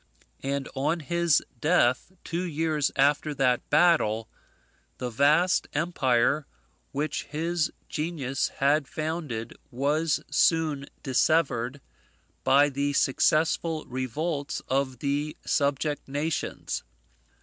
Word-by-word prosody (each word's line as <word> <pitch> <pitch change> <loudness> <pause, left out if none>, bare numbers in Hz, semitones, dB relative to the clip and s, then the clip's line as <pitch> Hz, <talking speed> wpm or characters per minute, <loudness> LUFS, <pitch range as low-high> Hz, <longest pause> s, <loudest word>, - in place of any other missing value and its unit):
And 140 0 -2
on 150 +5 0
his 170 0 +2 0.2
death, 150 -1 +2
two 170 +1 -3
years 155 -4 0
after 145 +2 +2
that 130 -2 +1
battle, 145 -9 +3 0.7
the 125 -1 -4
vast 150 +9 +3
empire 145 -3 +1 0.4
which 145 +1 -2
his 160 +2 -1 0.2
genius 150 -4 -2
had 140 +1 +2
founded 155 -8 -4
was 145 +4 +1
soon 155 -4 +2 0.2
dissevered 135 -2 +1 0.6
by 140 +2 +5
the 140 +1 -1
successful 155 +4 +2
revolts 140 +4 -3
of 130 -1 0
the 145 +3 -2
subject 145 +1 0
nations. 145 +4 -3
145 Hz, 95 wpm, -27 LUFS, 135-160 Hz, 0.7 s, by